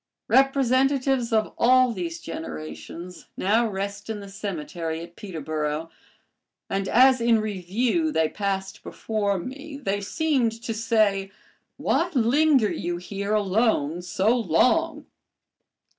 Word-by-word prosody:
Representatives 270 Hz, -1 st, +3 dB
of 220 Hz, -1 st, +1 dB
all 255 Hz, +1 st, +5 dB
these 170 Hz, -5 st, -4 dB
generations 120 Hz, -, -8 dB
now 225 Hz, +5 st, +2 dB
rest 200 Hz, +1 st, -5 dB
in 220 Hz, -2 st, -3 dB
the 200 Hz, -, -9 dB
cemetery 170 Hz, -5 st, -4 dB
at 170 Hz, +1 st, -11 dB
Peterboro, 155 Hz, -4 st, -4 dB, 0.8 s
and 195 Hz, 0 st, -1 dB
as 255 Hz, +2 st, +5 dB
in 230 Hz, -1 st, +4 dB
review 215 Hz, -, -1 dB
they 160 Hz, -, +2 dB
passed 195 Hz, +1 st, -3 dB
before 205 Hz, -3 st, -2 dB
me 275 Hz, -, -7 dB
they 205 Hz, -7 st, -2 dB
seemed 265 Hz, 0 st, 0 dB
to 230 Hz, -, -2 dB
say, 215 Hz, -3 st, +1 dB, 0.5 s
"Why 345 Hz, -, +1 dB
linger 260 Hz, 0 st, +3 dB
you 175 Hz, 0 st, -3 dB
here 200 Hz, +3 st, -3 dB
alone 195 Hz, -6 st, +1 dB
so 190 Hz, +6 st, +1 dB
long?" 285 Hz, -, +2 dB
210 Hz, 115 wpm, -25 LUFS, 180-250 Hz, 0.8 s, all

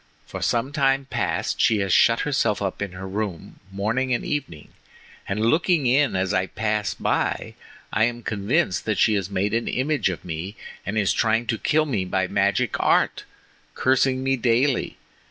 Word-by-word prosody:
For -, -, -7 dB
some 120 Hz, +3 st, 0 dB
time 135 Hz, -2 st, +1 dB
past -, -, -1 dB
she 110 Hz, -, +4 dB
has 95 Hz, -2 st, 0 dB
shut 115 Hz, 0 st, +4 dB
herself 125 Hz, -7 st, 0 dB
up 100 Hz, -1 st, -3 dB
in 100 Hz, -2 st, -3 dB
her 95 Hz, +1 st, -7 dB
room 100 Hz, -3 st, -5 dB
morning 115 Hz, +6 st, 0 dB
and -, -, -4 dB
evening, 130 Hz, -, -4 dB, 0.6 s
and 105 Hz, +3 st, 0 dB
looking 160 Hz, +3 st, +2 dB
in 135 Hz, -1 st, +3 dB
as 95 Hz, +1 st, 0 dB
I 95 Hz, -1 st, +1 dB
pass 105 Hz, 0 st, -2 dB
by, -, -, -1 dB, 0.4 s
I 110 Hz, +2 st, +3 dB
am 120 Hz, 0 st, -3 dB
convinced 105 Hz, -, 0 dB
that 110 Hz, -3 st, 0 dB
she 110 Hz, -, +4 dB
has 100 Hz, -2 st, -1 dB
made 100 Hz, +1 st, -1 dB
an 115 Hz, +1 st, 0 dB
image 130 Hz, -5 st, 0 dB
of 90 Hz, -3 st, -6 dB
me 90 Hz, +4 st, -5 dB, 0.3 s
and 105 Hz, +2 st, -2 dB
is 100 Hz, -3 st, +2 dB
trying 115 Hz, +1 st, +1 dB
to 115 Hz, -2 st, -2 dB
kill 155 Hz, 0 st, +2 dB
me 115 Hz, -10 st, -1 dB
by 95 Hz, +1 st, 0 dB
magic 100 Hz, 0 st, 0 dB
art, -, -, +2 dB, 0.5 s
cursing 130 Hz, 0 st, +2 dB
me 135 Hz, 0 st, +1 dB
daily. 125 Hz, +3 st, +1 dB
110 Hz, 175 wpm, -23 LUFS, 100-130 Hz, 0.6 s, she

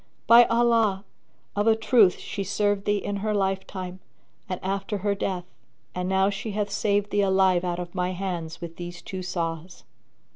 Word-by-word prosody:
By 235 Hz, +1 st, +8 dB
Allah, 230 Hz, -4 st, +2 dB, 0.5 s
of 205 Hz, +2 st, +1 dB
a 225 Hz, -, +6 dB
truth 220 Hz, -4 st, +4 dB
she 200 Hz, -, -5 dB
served 205 Hz, 0 st, 0 dB
thee 205 Hz, 0 st, +2 dB
in 200 Hz, 0 st, -3 dB
her 210 Hz, +1 st, -1 dB
life 195 Hz, -1 st, 0 dB
time 185 Hz, -1 st, -6 dB, 0.5 s
and 185 Hz, -, -3 dB
after 195 Hz, +2 st, -2 dB
her 205 Hz, -, +3 dB
death, 190 Hz, -3 st, -3 dB, 0.5 s
and 180 Hz, 0 st, -3 dB
now 190 Hz, +1 st, +3 dB
she 210 Hz, +2 st, -5 dB
hath 205 Hz, -1 st, -2 dB
saved 205 Hz, 0 st, 0 dB
thee 205 Hz, -, +2 dB
alive 190 Hz, -2 st, +3 dB
out 175 Hz, -1 st, -2 dB
of 175 Hz, -1 st, -6 dB
my 180 Hz, -1 st, -1 dB
hands 175 Hz, -3 st, -4 dB
with 170 Hz, -1 st, -7 dB
these 175 Hz, 0 st, -8 dB
two 190 Hz, -1 st, -6 dB
saws. 170 Hz, -1 st, -4 dB
195 Hz, 180 wpm, -25 LUFS, 180-205 Hz, 0.5 s, By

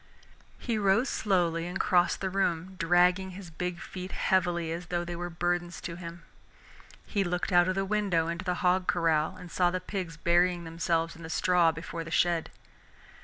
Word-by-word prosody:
He 230 Hz, -3 st, -2 dB
rose 200 Hz, +5 st, +3 dB
slowly 175 Hz, -5 st, 0 dB
and 180 Hz, +2 st, -4 dB
crossed 175 Hz, -1 st, +2 dB
the 190 Hz, -1 st, -2 dB
room, 185 Hz, -1 st, 0 dB
dragging 180 Hz, +2 st, +3 dB
his 185 Hz, -4 st, -10 dB
big 180 Hz, +2 st, -4 dB
feet 185 Hz, -1 st, -7 dB
heavily 175 Hz, -3 st, +1 dB
as 175 Hz, +2 st, -5 dB
though 175 Hz, -1 st, -2 dB
they 175 Hz, 0 st, -5 dB
were 175 Hz, +1 st, -4 dB
burdens 175 Hz, +1 st, -2 dB
to 170 Hz, -, -5 dB
him. 170 Hz, -1 st, -9 dB, 0.8 s
He 200 Hz, -3 st, 0 dB
looked 180 Hz, 0 st, -2 dB
out 175 Hz, 0 st, +5 dB
of 185 Hz, -, 0 dB
the 195 Hz, 0 st, 0 dB
window 195 Hz, -5 st, +1 dB
into 170 Hz, +2 st, -3 dB
the 180 Hz, -1 st, -1 dB
hog 180 Hz, +1 st, +3 dB
corral 165 Hz, 0 st, +1 dB
and 180 Hz, -2 st, -11 dB
saw 180 Hz, -1 st, +3 dB
the 185 Hz, +1 st, -2 dB
pigs 180 Hz, -3 st, -5 dB
burying 175 Hz, +1 st, +2 dB
themselves 165 Hz, 0 st, -1 dB
in 165 Hz, -, -13 dB
the 160 Hz, -, -8 dB
straw 175 Hz, -1 st, +3 dB
before 165 Hz, +1 st, -6 dB
the 165 Hz, -, -9 dB
shed. 170 Hz, 0 st, +1 dB
175 Hz, 185 wpm, -29 LUFS, 170-185 Hz, 0.8 s, out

